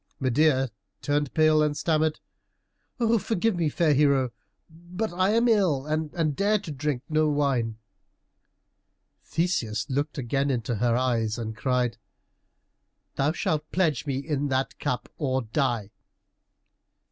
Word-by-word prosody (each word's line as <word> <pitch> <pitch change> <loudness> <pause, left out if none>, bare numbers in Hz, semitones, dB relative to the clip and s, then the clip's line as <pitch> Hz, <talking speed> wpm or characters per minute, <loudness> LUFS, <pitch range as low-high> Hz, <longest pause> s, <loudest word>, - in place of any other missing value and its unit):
Medeia 135 0 +2 0.3
turned 145 -1 0
pale 155 -1 +5
and 150 -1 +1
stammered, 155 0 +1 1.0
"Forgive 225 0 0
me, 165 -3 +1
fair 155 0 +2
hero, 140 -3 +3 0.4
but 175 +6 -5
I 185 +2 +2
am 230 +2 +3
ill 185 - +2
and 155 0 -1
dare 205 +5 +2
drink 150 -7 -3
no 155 0 +2
wine." 135 -7 0 1.5
Theseus 120 - -1
looked 145 +3 -1
again 135 +2 0
into 120 -3 -1
her 120 +2 +2
eyes 115 -3 0
and 110 -2 -4
cried, 125 0 0 1.1
"Thou 140 +2 +1
shalt 155 -2 -2
pledge 160 -6 +1
me 135 -2 -1
in 145 0 -2
that 135 0 -1
cup 125 - -2
or 130 -3 0
die!" 115 -3 -1
145 Hz, 125 wpm, -26 LUFS, 130-160 Hz, 1.5 s, pale